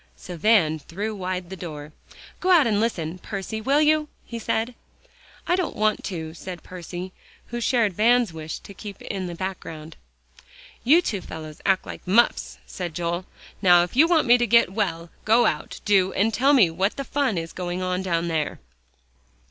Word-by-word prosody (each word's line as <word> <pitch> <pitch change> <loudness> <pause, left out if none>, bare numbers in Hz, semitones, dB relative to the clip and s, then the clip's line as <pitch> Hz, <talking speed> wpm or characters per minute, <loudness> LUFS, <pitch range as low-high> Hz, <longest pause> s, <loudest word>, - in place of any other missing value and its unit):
So 180 - -9
Van 165 -4 +3
threw 205 +9 -5
wide 185 -2 -4
the - - -4
door. 150 -4 -8 0.5
"Go 370 - -1
out 345 -5 +6
and 210 -3 +2
listen, 180 -6 -2
Percy, 205 +3 -5
will 275 +6 +3
you?" 305 0 +3 0.2
he 235 - -6
said. 225 +2 -1 0.7
"I 355 - +2
don't 370 -2 -2
want 215 0 +1
to," 160 -4 -5
said 175 +1 -8
Percy, 180 +1 -7 0.4
who 240 0 -4
shared 230 -5 +2
Van's 230 0 +3
wish 160 -1 -6
to 200 - -12
keep 200 0 -9
in 190 -2 -4
the 175 - -6
background. 165 -4 -6 0.9
"You 315 +9 +5
two 200 - -2
fellows 155 -2 -9
act 190 -1 +2
like - - -9
muffs," 225 +6 +2
said 175 -4 -6
Joel. 175 +2 -2 0.3
"Now 175 -3 +6
if 175 - -6
you 310 +5 +6
want 335 -3 +3
me 245 0 +6
to 240 - +1
get 230 -4 +4
well, 170 -5 -2
go 230 +3 +4
out, 150 - -2
do, 190 -2 +3
and 220 +3 +1
tell 275 +6 +4
me 205 - +5
what 190 +5 0
the 275 - -4
fun 275 -7 0
is 165 0 -4
going 180 0 -3
on 185 0 -1
down 170 -2 -1
there." 160 -3 -1
190 Hz, 185 wpm, -24 LUFS, 170-230 Hz, 0.9 s, out